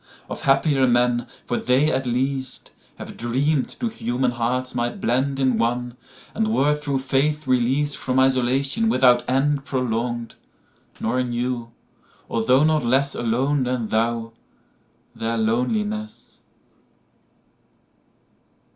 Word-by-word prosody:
Of - - -5
happier 135 -1 +3
men—for 120 0 0
they, 135 +5 +2
at 130 0 -1
least, 130 +1 -2 0.2
Have - - -9
dream'd 130 +4 -1
two 240 - -1
human 125 - -1
hearts 125 +2 -2
might 120 -1 -2
blendIn 130 0 +1
one, 120 +1 -1 0.4
and 220 0 0
were 150 -8 +3
through 145 -2 -2
faith 140 +3 0
releas'dFrom 130 +1 +1
isolation 135 - +2
without 125 - +4
endProlong'd, 125 -4 -1 0.7
nor 125 +3 0
knew, 120 -1 -3 0.6
although 125 +5 +3
not 155 0 +3
lessAlone 130 +1 +1
than 125 -3 -2
thou, 115 0 -1 0.8
their 115 +1 -2
loneliness. 210 - -2
130 Hz, 100 wpm, -22 LUFS, 120-140 Hz, 0.8 s, without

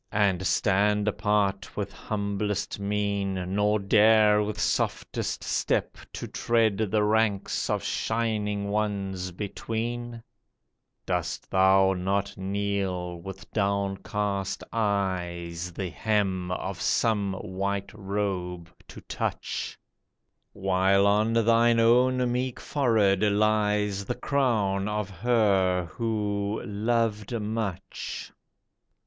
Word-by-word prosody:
And 95 -3 +2
stand 105 +1 +2
apart 105 -2 0
with - - -3
humblest 100 -1 -3
mien, 100 -1 -1 0.2
Nor 105 +1 +2
dare 105 +1 +5
with 105 0 -3
softest - - -1
step - - 0 0.2
to - - -5
tread 115 -4 +1
The 105 +1 +2
ranks 105 -2 +1
of - - 0
shining 105 -3 -1
Ones 100 -3 -2
between? 115 +4 -4 0.8
Dost - - -3
thou 95 0 +5
not 100 +2 -1
kneel 95 -2 -2
with 95 +2 -9
downcast 100 -1 -1
eyes 90 -5 -1
The 90 +1 -4
hem 95 0 0
of 90 0 -4
some 105 -4 +1
white 100 +1 -3
robe 95 -4 -3 0.2
to - - -11
touch. - - -4 0.7
While 95 0 +2
on 105 +3 +3
thine 115 +1 +4
own 125 +2 +4
meek 125 0 -2
forehead 110 -9 +2
lies 105 -1 +2
The - - -2
crown 105 -8 +1
of 105 -1 -2
her 95 -3 +2
who 105 -2 -1
'' - - -8
loved 110 +1 -1
much 105 -3 -4
100 Hz, 100 wpm, -27 LUFS, 95-110 Hz, 0.8 s, dare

